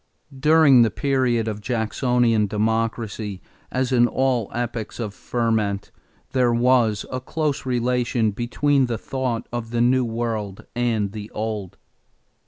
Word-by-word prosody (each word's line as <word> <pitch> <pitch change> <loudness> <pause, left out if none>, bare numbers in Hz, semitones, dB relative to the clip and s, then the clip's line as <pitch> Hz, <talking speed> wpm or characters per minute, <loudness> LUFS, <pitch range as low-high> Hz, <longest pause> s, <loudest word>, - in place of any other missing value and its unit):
= 135 - -15
During 155 -6 +7
the 115 - +4
period 130 -4 0
of 105 -1 -4
Jacksonian 115 -1 +1
Democracy, 110 -1 -2 0.3
as 130 0 -1
in 120 -1 +5
all 130 -4 0
epochs 120 -2 -4
of 105 -4 -3
ferment, 110 -5 -1 0.4
there 125 -2 +2
was 120 -3 +2
a 130 0 -3
close 150 0 -2
relation 120 -2 +1
between 130 +5 +1
the 115 -2 -2
thought 125 -3 -3
of 120 -1 -4
the 120 0 -2
New 125 +2 +3
World 115 -4 -3
and 115 -5 0
the 105 0 -7
Old. 105 -4 -4
120 Hz, 135 wpm, -23 LUFS, 110-125 Hz, 0.4 s, During